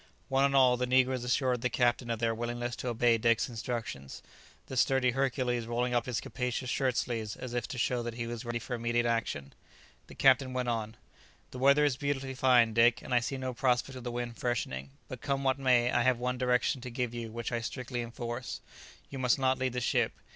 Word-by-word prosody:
One 135 +1 +3
and 140 0 +1
all, 130 -2 +5
the 125 0 -1
negroes 130 0 +2
assured 125 0 +1
the 125 - 0
captain 120 0 +1
of 115 - 0
their 115 0 0
willingness 120 +1 -3
to - - -5
obey 120 -1 +2
Dick's 115 0 +2
instructions, 115 - -5 0.4
the 130 - -7
sturdy 130 0 +3
Hercules 125 -2 -1
rolling 120 +1 -1
up 120 0 +1
his 125 -3 -1
capacious 125 0 -3
shirt 130 -3 0
sleeves 110 -4 -2
as 125 -2 -7
if 120 -2 -2
to 145 - -6
show 120 +1 0
that 120 -1 -5
he 115 -1 -3
was 120 0 -5
ready 120 -1 -2
for 120 +2 -6
immediate 120 0 0
action. 115 -12 -2 0.5
The - - -12
captain 130 -1 +4
went 125 -1 -1
on, 110 -2 -3 0.5
"The 125 - -7
weather 140 +3 +5
is 135 -3 +1
beautifully 135 -2 -2
fine, 125 -3 +4
Dick, 115 +1 +4
and - - -4
I 125 - +5
see 135 +3 -3
no 130 -1 -3
prospect 125 +1 0
of 125 - -8
the 120 - -4
wind 120 -1 -4
freshening; 70 - -2 0.2
but - - -8
come 140 -1 -1
what 135 0 +1
may, 125 -2 +3
I 120 - +2
have 130 0 +3
one 125 +1 -2
direction 125 +1 +1
to 125 - -6
give 120 -1 -3
you 115 -2 -5
which 115 +1 -4
I 120 -1 -1
strictly 125 +1 -4
enforce. 120 +1 -5 0.5
You 135 - -5
must 125 -1 +3
not 130 -1 +1
leave 130 -1 -1
the 125 - -2
ship. - - +1
125 Hz, 220 wpm, -30 LUFS, 120-130 Hz, 0.5 s, all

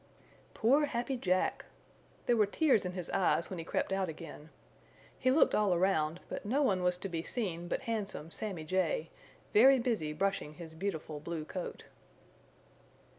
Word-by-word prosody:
Poor 275 +7 +4
Happy 255 0 -2
Jack! 185 -6 0 0.6
There 240 - +3
were 215 -3 +4
tears 255 - +3
in 180 - -3
his 180 -2 -5
eyes 185 -2 +2
when 185 - -4
he - - -4
crept 180 - -1
out 190 -2 0
again. 160 -1 -9 0.7
He 255 - +2
looked 275 +5 +5
all 205 -4 +3
around 170 -3 +1
but - - -5
no 265 +8 +1
one 190 -8 +2
was 180 0 +2
to 190 - -5
be 170 -3 -3
seen 175 -4 -3
but 190 - -2
handsome 210 - -3
Sammy 190 -6 -4
Jay, 165 -1 0 0.4
very 265 +5 +8
busy 230 -11 -1
brushing 155 -2 -1
his 165 -1 -9
beautiful 160 -4 -4
blue 160 0 -5
coat. 180 +2 -6
185 Hz, 165 wpm, -33 LUFS, 165-220 Hz, 0.7 s, very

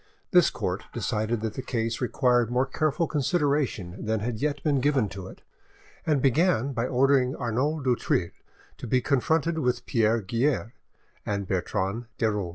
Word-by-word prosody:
This 180 -4 +6
court - - -3
decided 110 +1 -1
that 110 -1 -2
the - - -4
case 115 -2 -2
required 125 -2 +2
more 125 +2 +2
careful 155 +4 0
consideration 145 - -1
than 110 0 0
had 110 +1 -3
yet 145 -1 -1
been 145 -4 +2
given 135 -6 +2
to 95 -1 -8
it, - - -13 0.6
and 150 -4 +2
began 140 -1 +2
by 120 0 -1
ordering 130 0 +3
Arnauld 135 +5 -1
du 125 -2 +3
Thill 90 -5 0 0.5
to - - -6
be 130 +3 +3
confronted 160 +5 +1
with 125 -4 0
Pierre 115 0 +2
Guerre 115 +2 0 0.5
and 100 -2 -3
Bertrande 100 +4 -2
de 110 -1 +2
Rolls. 100 -4 -2
125 Hz, 165 wpm, -26 LUFS, 110-140 Hz, 0.6 s, This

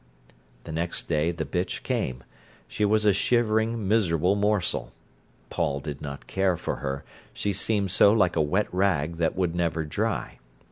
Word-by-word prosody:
The 80 - -8
next 85 +2 -2
day 80 0 +1
the 85 -2 -3
bitch 90 0 -3
came. 65 -1 -2 0.4
She 105 - -3
was 105 +1 +2
a 105 - +5
shivering, 110 0 +1
miserable 90 -4 +2
morsel. 105 -2 0 0.6
Paul 75 -5 0
did 70 -1 -6
not 70 -1 -7
care 95 -2 +1
for - - -3
her; 70 0 -4 0.3
she 100 - -1
seemed 100 -1 0
so 100 0 +6
like 100 -5 +3
a - - +3
wet 90 +8 +1
rag 85 -4 +1
that 80 -1 0
would 90 -3 0
never 85 -2 0
dry. 75 - -2
90 Hz, 160 wpm, -26 LUFS, 80-105 Hz, 0.6 s, so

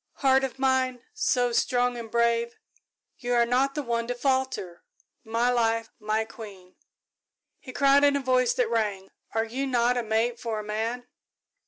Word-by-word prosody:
Heart 265 0 +3
of 265 -1 -3
Mine, 260 -2 0
so 250 - +1
strong 245 +1 +1
and 230 -2 -7
brave, 235 0 +1 0.6
you 245 -1 -1
are 235 0 +4
not 260 +3 +1
the 295 - -2
one 235 -2 -2
to 245 - -2
falter 260 -9 -1 0.4
my 230 +2 +1
Life, 230 -1 +1
my 215 +1 -1
Queen," 200 -5 -12 0.8
he 255 - -10
cried, 275 +2 +4
in 285 0 +5
a - - +1
voice 255 -2 +2
that 240 -2 0
rang, 205 -4 -1 0.2
"are 225 0 +1
you 260 +5 -3
not 245 -1 +2
a 245 - 0
mate 225 +2 0
for 225 -2 -3
a - - -5
man?" 225 +4 -3
240 Hz, 170 wpm, -26 LUFS, 225-255 Hz, 0.8 s, in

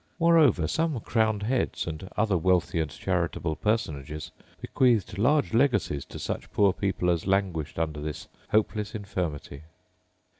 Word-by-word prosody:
Moreover, 160 - +4
some 160 - 0
crowned 110 -2 +1
heads, 125 +4 -1
and 85 +3 -6
other 105 -2 +2
wealthy 90 -1 +2
and 80 -2 -1
charitable 80 +3 -2
personages, 75 -7 -2 0.3
bequeathed 115 -7 +1
large 140 +4 +2
legacies 115 - +1
to - - -10
such - - -5
poor 100 -2 +3
people 90 -3 0
as 85 +1 -2
languished 95 -6 0
under 80 -2 -2
this 75 -1 -5 0.2
hopeless 105 -1 0
infirmity. 85 -8 -4
95 Hz, 135 wpm, -27 LUFS, 80-110 Hz, 0.3 s, Moreover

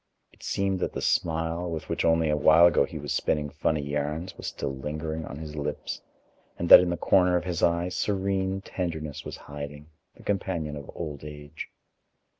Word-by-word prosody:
It - - -22
seemed 95 -1 0
that - - -2
the - - -3
smile, 80 +1 0
with 80 -2 -4
which - - -1
only 80 -1 +3
a - - +3
while 80 +3 +7
ago 80 -5 +5
he 80 - -8
was 75 -2 -3
spinning 75 -1 0
funny 75 +1 0
yarns, 75 +5 -3
was - - -7
still 70 - -3
lingering 75 +3 -4
on 70 - -7
his 75 -1 -7
lips, 75 0 -4 0.6
and 85 - -2
that - - +13
in 90 - +1
the 85 - -1
corner 90 +1 +4
of 85 - -2
his 90 -2 -2
eye 85 +1 +2
serene 95 0 -1
tenderness 80 -6 -4
was - - -7
hiding, 75 +1 -8 0.2
the - - -16
companion 90 -6 -2
of 70 -1 -8
old 75 -4 -5
age. 75 0 -8
80 Hz, 190 wpm, -27 LUFS, 75-85 Hz, 0.6 s, that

